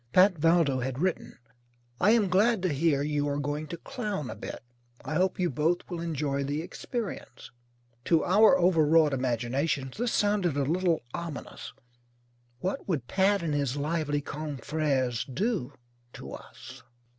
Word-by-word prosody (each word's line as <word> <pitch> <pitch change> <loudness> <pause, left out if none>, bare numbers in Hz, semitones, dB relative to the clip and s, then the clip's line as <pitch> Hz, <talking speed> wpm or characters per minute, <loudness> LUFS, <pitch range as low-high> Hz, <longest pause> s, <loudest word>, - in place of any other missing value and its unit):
Pat 190 +2 +6
Valdo 165 -4 +3
had 130 0 -3
written: 185 +4 -2 0.6
"I 200 - +4
am 220 -3 +4
glad 200 +3 +3
to 180 -5 +1
hear 145 -1 +2
you 145 -1 0
are 140 - -1
going 145 +1 -3
to 170 - -6
clown 210 - -4
a - - -7
bit. - - -7 0.4
I - - -3
hope 185 +4 +1
you 180 - +2
both 155 +6 0
will 170 -1 -3
enjoy 145 -4 -1
the 145 +3 -2
experience." 200 - -6 0.5
To 165 -2 +3
our 215 +8 +6
overwrought 160 - +4
imaginations 130 +2 -1
this 240 0 0
sounded 200 -7 +1
a 140 - +2
little 170 +3 +1
ominous. 105 - -6 0.9
What 190 - -3
would 145 -9 -1
Pat 195 0 +2
and 155 -3 -1
his 140 -2 -1
lively 145 -1 -1
confrères 140 -4 -2
do 185 - -1 0.4
to - - -9
us? - - -11
155 Hz, 150 wpm, -28 LUFS, 140-185 Hz, 0.9 s, Pat